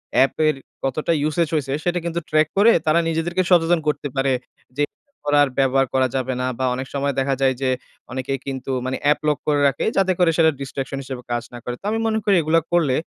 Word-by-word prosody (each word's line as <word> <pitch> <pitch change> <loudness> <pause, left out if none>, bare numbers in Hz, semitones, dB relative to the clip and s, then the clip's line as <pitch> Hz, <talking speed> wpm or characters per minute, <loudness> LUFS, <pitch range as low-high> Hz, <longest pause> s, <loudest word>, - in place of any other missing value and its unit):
অ্যাপের 155 +3 +3 0.3
কতটা 150 +5 -1 0.2
usage 155 0 0
হইছে 135 -3 -1
সেটা 175 0 0
কিন্তু 170 0 -1
track 155 0 +3
করে 220 +3 +7
তারা 155 +2 +4
নিজেদেরকে 170 +3 0
সচেতন 170 -1 +4
করতে 145 -1 0
পারে। 135 0 +1 0.5
যে 145 - +2 0.3
এর 285 - -45
পরে 145 0 +3
আর 140 - 0
ব্যবহার 135 0 +3
করা 130 -1 +3
যাবে 130 0 -1
না 125 - 0
বা 130 - +1
অনেক 130 +1 -5
সময় 140 0 0
দেখা 135 0 +1
যায় 135 -1 +4
যে, 130 - +1 0.4
অনেকেই 130 +1 -3
কিন্তু 135 0 -4
মানে 130 0 -2
অ্যাপ 145 +1 +3
লক 150 -1 +2
করে 145 -1 +2
রাখে। 140 - -1
যাতে 190 -1 +3
করে 175 - +5
সেটা 160 -1 +5
distraction 135 0 -4
হিসাবে 130 -2 -6
কাজ 120 -1 -1
না 120 - -7
করে। 125 - -4
তো - - -13
আমি 225 - 0
মনে 220 0 +1
করি 200 -2 +4
এগুলো 160 +1 +3
করলে 150 -7 +3
145 Hz, 220 wpm, -21 LUFS, 135-165 Hz, 0.5 s, করে